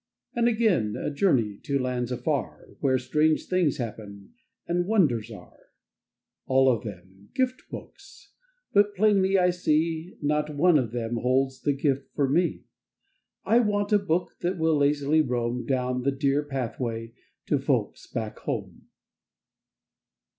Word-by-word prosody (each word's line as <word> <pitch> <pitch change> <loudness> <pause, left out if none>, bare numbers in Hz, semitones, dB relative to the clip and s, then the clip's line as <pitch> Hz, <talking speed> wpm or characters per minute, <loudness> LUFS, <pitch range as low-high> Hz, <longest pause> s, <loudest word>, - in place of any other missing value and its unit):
And 235 0 +2
again 215 - +2
a - - -3
journey 130 - +1
To 140 - -1
lands 125 -2 -2
afar, 125 +3 -3
Where 130 -2 +2
strange 155 +4 +1
things 180 -6 +1
happen, 105 -4 -7 0.3
And 175 +1 0
wonders 140 - +2
are. 110 - -13 0.9
All 130 0 +4
of 110 - -8
them 95 -1 -11
— - - -41
Gift 255 -1 0
books 395 0 -12 0.4
But 205 0 +4
plainly 195 -1 +3
I 180 -1 +4
see, 165 +2 -1
Not 150 0 -1
one 165 +1 +5
of 120 -4 -2
them 120 -1 -3
holds 130 +2 0
The 145 - +1
gift 140 -1 -1
for 140 -2 +2
me. 170 +6 +1 0.8
I 230 - +4
want 205 -2 0
a 205 - +6
book 180 -2 -1
That 180 +2 -1
will 160 -1 +2
lazily 145 +2 +3
roam 125 -3 -2
Down 125 -1 0
the 140 +2 +1
dear 140 +1 +1
Pathway 115 -4 -4 0.3
To - - +1
Folks - - -1
back 110 -2 -5
home. - - -5
140 Hz, 145 wpm, -26 LUFS, 125-180 Hz, 0.9 s, a